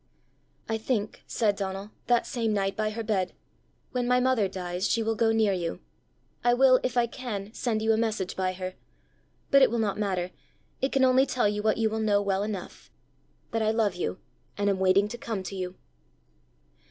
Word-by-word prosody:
"I 225 0 -1
think," 220 -2 -2
said 210 -3 +1
Donal, 195 +1 -4 0.2
that 240 0 +3
same 230 -3 -1
night 195 -1 0
by 215 +1 0
her 225 +2 -4
bed, 195 -4 0 0.6
"when 250 -2 -1
my 250 0 +4
mother 250 -5 +2
dies, 180 0 -3
she 230 - +2
will 225 +1 +1
go 225 +1 +2
near 220 -3 +3
you: 170 -3 -3 0.6
I 240 0 +4
will, 255 0 +6
if 250 -1 -2
I 240 - +5
can, 225 -4 -6
send 220 -4 -1
you 220 0 +4
a - - +1
message 215 -5 -1
by 185 -1 0
her. 185 0 -5 0.8
But 275 -1 +7
it 265 - +7
will 235 - -1
not 210 -2 0
matter; 185 -3 -1 0.5
it 265 - +1
can 270 - +3
only 260 +1 +4
tell 250 -5 +1
you 210 0 -1
what 215 0 +2
you 225 -1 +2
will 220 +1 -2
know 210 -2 +3
well 200 -1 0
enough 205 -3 -6 0.6
that 225 - 0
I 215 - +2
love 220 -3 +2
you, 180 +1 -3 0.4
and 200 0 +2
am 190 - -1
waiting 190 +2 +4
to 240 +3 -7
come 220 -6 -3
to 195 - -6
you." 185 -1 -4
215 Hz, 200 wpm, -27 LUFS, 195-230 Hz, 0.8 s, But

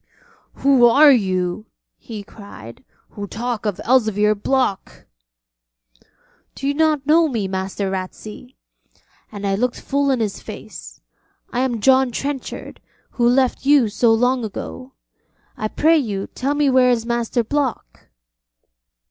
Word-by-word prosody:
'Who 270 -3 +4
are 285 +5 +7
you?' 190 -3 0 0.3
he 215 -3 -8
cried, 130 - -13 0.3
'who 205 -1 -7
talk 230 0 -4
of 205 - -3
Elzevir 215 -4 +3
Block.' 215 -1 -2 1.5
'Do 275 - -4
you 285 - +1
not 305 -2 +1
know 320 +2 +4
me, 225 -8 -2
Master 190 +1 -3
Ratsey?' 210 +6 -7 0.8
and 205 -1 -6
I 195 - 0
looked 240 +5 -1
full 280 0 -1
in 260 -2 +1
his 210 -3 -3
face. - - -10 0.5
'I 245 - -1
am 245 -4 -1
John 265 +2 +4
Trenchard, 270 +3 -5 0.3
who 240 -1 +2
left 255 0 +1
you 280 -6 +5
so 225 +2 +2
long 245 +2 +2
ago. 255 +5 -7 0.6
I 215 - -3
pray 320 +8 +3
you 205 -7 -3
tell 275 +3 -2
me 295 -1 +2
where 255 -1 +4
is 235 -2 +1
Master 235 0 -1
Block?' 265 - -3
240 Hz, 135 wpm, -20 LUFS, 205-265 Hz, 1.5 s, are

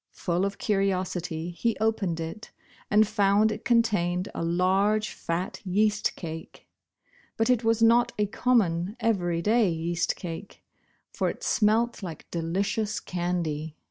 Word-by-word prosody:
Full 180 +1 -1
of 200 0 -3
curiosity 185 -4 -1
he 230 +6 -1
opened 210 -6 0
it 165 +6 -6 0.4
and 210 +1 +5
found 210 0 +3
it 210 - -5
contained 205 -6 +1
a - - -3
large 195 +5 +2
fat 170 +2 -4
yeast 210 +2 +1
cake. 160 -2 -8 0.7
But 225 +3 +3
it 245 -2 +2
was 225 0 +2
not 235 +1 +5
a 210 - +2
common 205 -5 +1
everyday 210 0 +2
yeast 170 +1 -1
cake, 175 +3 -8 0.5
for - - 0
it - - -7
smelt 225 +2 +2
like 170 -5 -7
delicious 200 +6 -1
candy. 170 -4 -3
195 Hz, 130 wpm, -27 LUFS, 175-215 Hz, 0.7 s, and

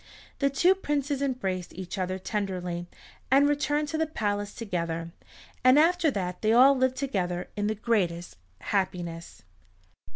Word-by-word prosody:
The 275 - +3
two 345 +7 +4
princes 290 -6 -2
embraced 195 -10 -2
each 185 +2 -6
other 185 0 -1
tenderly, 185 -3 -3 0.4
and 275 +2 +5
returned 290 +1 0
to 315 - -2
the 320 - +1
palace 205 -7 -2
together, 170 -6 -3 0.5
and 255 +2 +6
after 335 +1 +4
that 180 -7 -3
they 215 - +2
all 265 +4 +7
lived 260 0 +1
together 180 -11 -2
in 205 0 -1
the 215 - -1
greatest 180 - -1 0.2
happiness. 175 - -3
210 Hz, 140 wpm, -27 LUFS, 180-275 Hz, 0.5 s, all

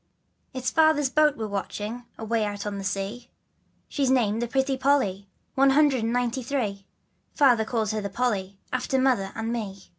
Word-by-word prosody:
/TS 255 -1 -2
Father's 315 -4 +4
boat 300 0 +3
we're 220 - -3
watching, 210 +3 -4
Away 225 0 -1
out 205 -1 -4
on 205 -1 -3
the - - -5
sea, 205 +5 -4 0.6
She's 275 -3 0
named 230 -4 +2
the 240 - -1
Pretty 265 +2 0
Polly, 255 -8 +1 0.2
One 275 +1 +4
hundred 275 -2 +4
and 225 - 0
ninety 245 +1 0
three, 215 -7 -3 0.5
Father 245 -6 +4
called 220 -2 -1
her 215 -1 -2
the 200 - -4
Polly, 200 -4 -2 0.2
After 255 +1 0
Mother 250 -8 +2
and 225 +1 -3
me. 205 -4 -4
235 Hz, 175 wpm, -26 LUFS, 205-265 Hz, 0.6 s, Father's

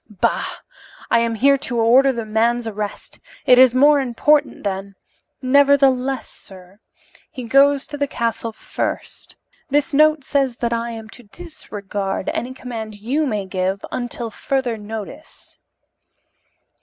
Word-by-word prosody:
"Bah! 205 -3 -2 0.5
I - - +5
am 230 0 0
here 275 +5 +4
to 245 -2 -3
order 255 +4 +5
the 235 -3 -4
man's 230 +2 0
arrest. 210 -1 -6 0.3
It 250 0 +6
is 255 -1 +6
more 290 +2 +5
important 280 +4 +1
than 195 0 -4 0.2
" - - -33
"Nevertheless, 270 -1 +3
sir, 190 +1 -14 0.5
he 255 - -8
goes 275 +3 +4
to 290 -1 -8
the 285 - +1
castle 230 -3 -2
first. - - -5 0.3
This 290 +2 +1
note 305 0 +4
says 270 -3 0
that 235 -1 -1
I 235 0 -2
am 225 -1 -8
to 245 - -13
disregard 205 - -5
any 255 +2 -4
command 225 -4 -7
you 280 +8 -1
may 210 -5 -2
give 190 +1 -2
until 240 -2 -4
further 260 0 -2
notice." 215 +7 -10
240 Hz, 140 wpm, -20 LUFS, 215-275 Hz, 0.5 s, It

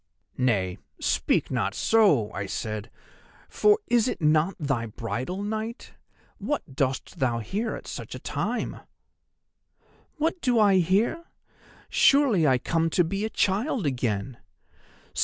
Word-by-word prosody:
"'Nay, 100 -8 0 0.2
speak - - +1
not - - -1
so,' 170 - +3
I 100 -1 -4
said, 110 +2 -4 0.6
'for 420 0 +4
is 240 0 +3
it - - -2
not 155 +3 +2
thy 135 -6 -1
bridal 130 - -4
night? 220 +4 -5 0.5
What 225 - -3
dost 130 -1 -2
thou 120 -3 +1
here 200 - -3
at - - -9
such - - -7
a - - -7
time?' - - -3 1.4
"'What 325 +3 -1
do 245 -3 +2
I 200 -3 +5
here? 205 - +1 0.6
Surely 255 - +4
I 130 -2 +4
come 165 +5 0
to 175 - +3
be 195 +5 -2
a - - -2
child 215 - 0
again! 120 -3 -2
165 Hz, 130 wpm, -26 LUFS, -, 1.4 s, I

